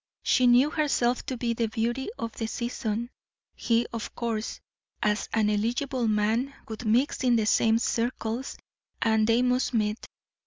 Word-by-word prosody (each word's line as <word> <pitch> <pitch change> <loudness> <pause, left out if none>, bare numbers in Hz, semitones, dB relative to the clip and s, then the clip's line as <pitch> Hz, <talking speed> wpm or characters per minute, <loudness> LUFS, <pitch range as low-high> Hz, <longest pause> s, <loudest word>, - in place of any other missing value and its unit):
She 255 -2 +3
knew 250 +5 +5
herself 255 -6 +1
to 260 - -3
be 235 -1 -1
the 230 0 0
beauty 235 +4 -2
of 230 - -4
the 225 0 -4
season; 235 0 -3 0.4
he, 235 0 +1
of 230 -2 -5
course, 225 -2 -3 0.4
as 210 0 0
an 220 -2 +2
eligible 235 +4 0
man, 220 +6 +1
would 220 +2 -7
mix 245 +6 +1
in 245 -2 +4
the 220 -2 +2
same 225 +1 +3
circles, 235 +1 -2 0.4
and 220 -1 +2
they 230 +2 +3
must 250 0 +1
meet. 215 0 0
230 Hz, 155 wpm, -27 LUFS, 220-250 Hz, 0.4 s, knew